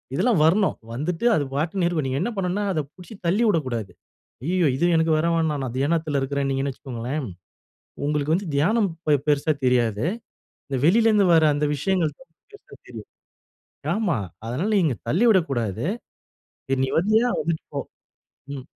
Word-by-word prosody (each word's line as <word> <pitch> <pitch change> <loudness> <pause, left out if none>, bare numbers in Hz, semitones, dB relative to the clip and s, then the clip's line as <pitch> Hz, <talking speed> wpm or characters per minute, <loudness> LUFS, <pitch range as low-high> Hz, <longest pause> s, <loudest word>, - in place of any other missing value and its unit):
இதெல்லாம் 215 - +2
வரணும். 190 +5 +3 0.2
வந்துட்டு 165 - -3
அது 150 - +1
பாட்டுக்கு 170 +5 0
இருக்கும். 160 -5 -1
நீங்க 130 +1 -1
என்ன 240 - -1
பண்ணணும்னா 190 +2 -1
அத 155 - 0
புடிச்சு 185 +4 -12
தள்ளி 200 +7 +2
உடக்கூடாது. 120 - -2 0.5
அய்யயோ 175 +2 +2
இது 170 - +1
எனக்கு 160 0 +2
வர 165 - +1
வேணாம். 155 -4 0
நான் 125 -1 -6
தியானத்துல 155 0 0
இருக்குறேனிங்கன்னு 135 0 -1
வச்சுக்கோங்களேன். 130 +2 -5 0.8
உங்களுக்கு 150 +1 0
வந்து 190 +1 -3
தியானம் 200 +9 +2 0.2
பெ 150 - +5
பெருசா 150 +1 +2
தெரியாது. 120 -2 +2 0.6
இந்த 135 - -2
வெளிலருந்து 210 +3 +4
வர 160 -1 +5
அந்த 145 +1 0
விஷயங்கள் 160 0 0
தான் 265 - -17 0.2
பெருசா 415 - -15
தெரியும். - - -10 0.9
ஆமா, 195 - 0 0.3
அதனால 140 - -2
நீங்க 155 -9 +1
தள்ளிவிடக்கூடாது. 145 - +2 0.8
சரி 135 -1 0
நீ - - -2
வரியா, 215 +7 +3
வந்துட்டு 160 +1 -2
போ. - - -1 0.7
ம். 135 -2 -7
155 Hz, 145 wpm, -23 LUFS, 135-185 Hz, 0.9 s, பெ